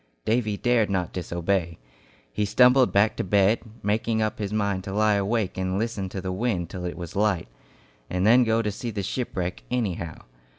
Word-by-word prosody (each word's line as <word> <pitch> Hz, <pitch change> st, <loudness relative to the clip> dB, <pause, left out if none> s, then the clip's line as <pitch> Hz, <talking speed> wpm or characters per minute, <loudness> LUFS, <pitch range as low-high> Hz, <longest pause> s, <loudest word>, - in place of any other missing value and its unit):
Davy 110 Hz, -2 st, +1 dB
dared 120 Hz, -3 st, +2 dB
not 90 Hz, -3 st, -1 dB
disobey. 85 Hz, -1 st, -1 dB, 0.6 s
He 105 Hz, -, 0 dB
stumbled 125 Hz, +5 st, +5 dB
back 105 Hz, +2 st, +3 dB
to -, -, -1 dB
bed, 100 Hz, +3 st, +3 dB, 0.2 s
making 110 Hz, +2 st, 0 dB
up 110 Hz, +2 st, -1 dB
his 105 Hz, -1 st, -3 dB
mind 100 Hz, -3 st, -1 dB
to 95 Hz, -, -5 dB
lie 105 Hz, +1 st, +3 dB
awake 100 Hz, -1 st, 0 dB
and 95 Hz, 0 st, -1 dB
listen 105 Hz, -3 st, -2 dB
to 95 Hz, -, -5 dB
the 95 Hz, 0 st, -3 dB
wind 95 Hz, -4 st, -1 dB
till 90 Hz, -2 st, -5 dB
it 90 Hz, -, -4 dB
was 90 Hz, +2 st, -7 dB
light, 100 Hz, -, +1 dB, 0.6 s
and 90 Hz, +1 st, 0 dB
then 120 Hz, +4 st, +6 dB
go 115 Hz, 0 st, +1 dB
to 105 Hz, -, -1 dB
see 120 Hz, +4 st, -5 dB
the 100 Hz, -3 st, -3 dB
shipwreck 90 Hz, -6 st, -3 dB
"anyhow." 95 Hz, -9 st, -3 dB
100 Hz, 185 wpm, -25 LUFS, 95-110 Hz, 0.6 s, then